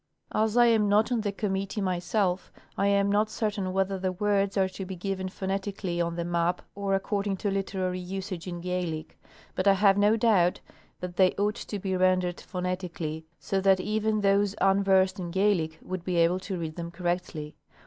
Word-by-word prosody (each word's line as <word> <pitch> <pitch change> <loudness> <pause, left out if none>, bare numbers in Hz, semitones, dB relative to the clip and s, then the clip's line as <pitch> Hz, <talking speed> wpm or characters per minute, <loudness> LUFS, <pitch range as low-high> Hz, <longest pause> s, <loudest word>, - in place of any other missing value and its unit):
As 220 +1 +1
I 240 - +7
am 220 -3 +4
not 215 +4 +3
on 240 -2 +1
the 205 -1 -1
com 200 0 -2
mittee 195 +2 -2
myself, 185 0 0 0.2
I 200 - +1
am 200 0 +3
not 210 +1 +2
certain 210 -4 -2
whether 195 0 0
the 185 0 -1
words 200 +1 0
are 190 -1 +3
to 190 +1 -7
be 190 0 -6
given 190 +1 -3
phonetically 190 -2 -3
on 170 0 -1
the 170 0 -2
map 170 +1 0
or 200 -1 0
according 200 0 -1
to 200 +1 -1
literary 190 -2 -2
usage 185 -1 -5
in 175 -1 -5
Gaelic; 170 -3 -3 0.3
but 185 - -1
I 200 - +7
have 195 0 +4
no 210 +2 +4
doubt 200 -6 +3 0.4
that 180 -1 -6
they 185 -1 +5
ought 205 +1 +1
to 210 -2 -6
be 190 -1 -2
rendered 185 -1 +2
phonetically, 180 -4 -4
so 195 -1 -1
that 190 -1 +4
even 215 +2 0
those 200 0 +2
unversed 195 0 +3
in 175 -2 -4
Gaelic 175 -4 +1
would 185 -1 -5
be 180 0 -2
able 170 +2 +3
to 190 0 -4
read 160 -1 -5
them 170 -1 -4
correctly. 175 -3 -3
190 Hz, 190 wpm, -28 LUFS, 180-200 Hz, 0.4 s, I